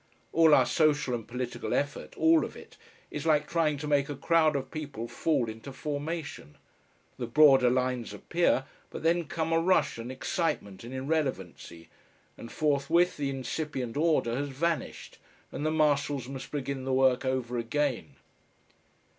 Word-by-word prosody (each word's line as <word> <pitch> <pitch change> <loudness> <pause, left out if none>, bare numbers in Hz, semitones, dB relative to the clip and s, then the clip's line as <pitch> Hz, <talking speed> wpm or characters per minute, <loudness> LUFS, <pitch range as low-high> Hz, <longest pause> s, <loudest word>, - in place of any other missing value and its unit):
All 160 -2 +6
our - - +4
social 150 -5 +2
and 115 -2 -4
political 125 0 -3
effort, 145 0 -3
all 325 0 +5
of - - -6
it, - - -14 0.4
is - - -4
like 150 -1 +3
trying 155 -3 +1
to 150 - -6
make 145 -1 +2
a 145 - -3
crowd 155 +1 +2
of 135 -1 -3
people 145 -7 -5
fall 130 -2 0
into 110 +5 -8
formation. 145 - -5 0.6
The 120 - -3
broader 135 -1 +6
lines 125 -2 -1
appear, 135 - 0 0.2
but - - -8
then 170 +1 +2
come 160 +1 -2
a 165 - +4
rush 180 -7 +2
and 120 +2 -6
excitement 130 - -3
and 120 - -8
irrelevancy, 130 - -3 0.5
and 115 - -10
forthwith 155 +4 +2
the 140 -2 -1
incipient 135 -1 -4
order 150 -6 +1
has 145 +1 -2
vanished 160 +4 -3 0.3
and - - -5
the 155 - +1
marshals 145 -4 +1
must 135 0 -7
begin 140 -2 -4
the 130 0 -1
work 130 -1 +3
over 130 -2 -1
again! 130 +2 -2
140 Hz, 155 wpm, -29 LUFS, 125-155 Hz, 0.6 s, All